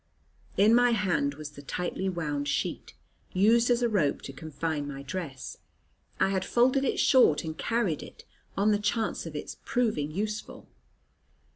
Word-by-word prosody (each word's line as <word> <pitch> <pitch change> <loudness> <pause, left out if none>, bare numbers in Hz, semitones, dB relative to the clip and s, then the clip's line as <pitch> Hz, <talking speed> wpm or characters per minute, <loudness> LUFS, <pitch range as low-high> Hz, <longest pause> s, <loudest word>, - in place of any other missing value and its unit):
In 210 +3 +6
my 245 0 +5
hand 175 -9 +1
was 150 0 -8
the 145 - -11
tightly 180 +6 -3
wound 150 -5 -2
sheet, - - -2 0.4
used 230 +6 +4
as 245 0 +3
a - - +4
rope 185 -11 +1
to 135 - -7
confine 155 0 -3
my 140 -1 -6
dress. 140 -3 -6 0.6
I - - +3
had 190 -1 0
folded 255 +5 +3
it 270 - 0
short 255 - +5
and 160 -1 -5
carried 220 -5 0
it, - - -12 0.3
on 205 +2 +3
the 205 - +2
chance 210 -3 -1
of 155 - -8
its 150 - -6
proving 215 -12 0
useful. 210 +6 -4
185 Hz, 160 wpm, -28 LUFS, 150-225 Hz, 0.6 s, In